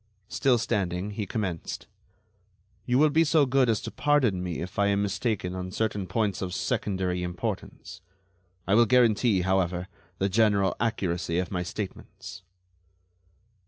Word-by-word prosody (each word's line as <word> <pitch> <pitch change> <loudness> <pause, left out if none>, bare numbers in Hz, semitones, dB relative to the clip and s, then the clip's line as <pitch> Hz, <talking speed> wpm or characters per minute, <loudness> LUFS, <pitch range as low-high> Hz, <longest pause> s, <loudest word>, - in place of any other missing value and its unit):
Still 130 -3 +2
standing, 100 -4 -1
he 105 -1 -4
commenced: 95 -6 -4 1.0
"You 125 - +3
will 150 +2 +4
be 160 +3 +4
so 155 -2 +4
good 130 -1 +2
as 110 -2 +2
to - - -6
pardon 135 -11 +2
me 90 -3 -3
if 90 +3 -6
I 100 - +4
am 100 0 +1
mistaken 100 -2 -2
on 90 0 -5
certain 105 -1 -2
points 100 +1 -1
of 90 -2 -3
secondary 95 -3 -1
importance. 90 0 -5 0.6
I 95 - +1
will 115 +2 +5
guarantee, 115 -4 +3
however, 90 -1 0 0.3
the 95 - +1
general 100 -2 +2
accuracy 90 -6 -1
of 90 -1 -2
my 90 -2 -1
statements." 95 0 -7
100 Hz, 145 wpm, -27 LUFS, 90-115 Hz, 1.0 s, will